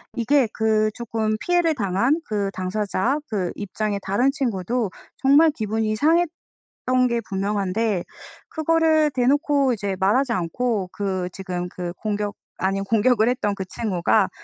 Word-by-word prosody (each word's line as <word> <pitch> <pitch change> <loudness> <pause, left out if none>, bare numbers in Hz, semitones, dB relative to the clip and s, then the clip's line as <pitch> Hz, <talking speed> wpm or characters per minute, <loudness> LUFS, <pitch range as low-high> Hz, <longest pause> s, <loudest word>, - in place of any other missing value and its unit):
이게 255 +1 +3
그 215 -1 +2
쪼끔 220 -2 -2
피해를 350 -2 +2
당한 235 - +1
그 200 -3 -2
당사자 200 +7 -1
그 190 -5 -1
입장에 205 0 -3
다른 240 +8 +1
친구도 235 - -1 0.3
정말 285 +4 +5
기분이 215 -2 -1
상했던 305 -4 0
게 235 0 0
분명한데 200 0 -1 0.5
그거를 315 -1 +2
대놓고 275 +1 +2
이제 200 -3 -2
말하지 235 +7 +2
않고 195 +2 -1
그 190 -3 -2
지금 180 -2 -4
그 175 -1 -5
공격 205 0 -3 0.2
아닌 195 +1 0
공격을 225 +2 +3
했던 210 -5 0
그 190 - -5
친구가 190 -1 +1
215 Hz, 275 characters per minute, -23 LUFS, 195-255 Hz, 0.5 s, 정말